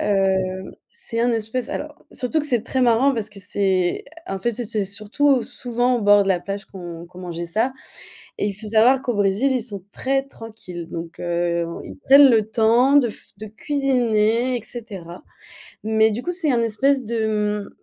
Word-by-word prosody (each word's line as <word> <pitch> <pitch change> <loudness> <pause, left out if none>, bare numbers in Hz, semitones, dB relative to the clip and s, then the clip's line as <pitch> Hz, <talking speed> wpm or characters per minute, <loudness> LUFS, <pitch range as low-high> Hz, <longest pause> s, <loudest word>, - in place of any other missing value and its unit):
Hem, 190 -2 0 0.2
c'est 235 - -3
un 240 +1 +2
espèce 225 +2 -2
alors 300 +1 -6
surtout 260 +5 -1
que 300 - -1
c'est 240 -5 +1
très 260 - -2
marrant 250 +3 +4
parce 215 -2 -3
que 205 - -12
c'est 190 -2 0 0.2
en 195 - -3
fait, 240 - +1
c'est 240 +2 -3
c'est 210 -1 -1
surtout 230 +7 +1
souvent 245 +1 0
en - - -2
bord 205 -1 +5
de - - -2
la 180 -2 +2
plage 200 +1 -5
qu'on 175 -3 -9
qu'on 180 +1 -15
mangeait 170 -1 -5
ça 225 +9 0 0.7
et 205 - 0
il 200 - -2
faut 215 +1 -8
savoir 240 +5 +4
qu'au 245 -3 -1
Brésil, 205 +7 +2
ils 250 -3 0
sont 200 -5 -7
très 270 +1 0
tranquilles 215 -9 -9
donc 165 0 -7
heu, 170 -1 -1 0.2
ils - - -9
prennent 275 0 +7
le 220 -2 +2
temps 235 +5 +4
de 250 -5 +5
f - - -13
de 215 - -7
cuisiner, 245 -1 +1
et - - -12
cetera, 195 -8 -9 0.6
mais 220 0 +3
du 230 +4 -3
coup, 355 - -2
c'est 340 -5 0
un 235 -2 +2
espèce 260 +4 +1
de, 210 -2 -1
mmh, - - -13
220 Hz, 195 wpm, -22 LUFS, 195-250 Hz, 0.7 s, prennent